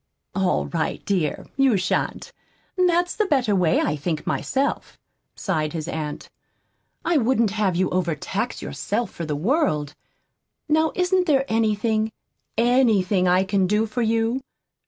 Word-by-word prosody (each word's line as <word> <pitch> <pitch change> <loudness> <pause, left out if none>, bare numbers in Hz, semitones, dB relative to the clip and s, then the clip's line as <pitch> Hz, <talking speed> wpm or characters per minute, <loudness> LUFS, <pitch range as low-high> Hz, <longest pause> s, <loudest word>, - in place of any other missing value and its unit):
"All 190 -2 +1
right, 165 -2 -3
dear, 180 -7 -1
you 270 -6 +4
shan't. 180 -1 -2 0.4
That's 355 -1 +2
the 430 - +1
better 250 - +2
way, 175 -4 +3
I 150 - 0
think 155 +1 -3
myself," 275 +1 -1 0.4
sighed 155 0 -2
his 160 -1 -4
aunt. 155 -3 -4 0.8
"I 340 -2 +3
wouldn't 235 -4 +2
have 205 -4 0
you 185 +1 +2
overtax 175 -4 -2
yourself 205 - -2
for 165 - -6
the 150 - -1
world. 155 - 0 0.7
Now 315 +1 +2
isn't 365 0 +2
there 270 -3 +3
anything, 220 -1 +1 0.5
ANYTHING 220 -7 +3
I 180 +1 +4
can 195 -1 +1
do 210 +3 +2
for 225 +3 -3
you?" 230 +3 +1
215 Hz, 135 wpm, -23 LUFS, 180-265 Hz, 0.8 s, you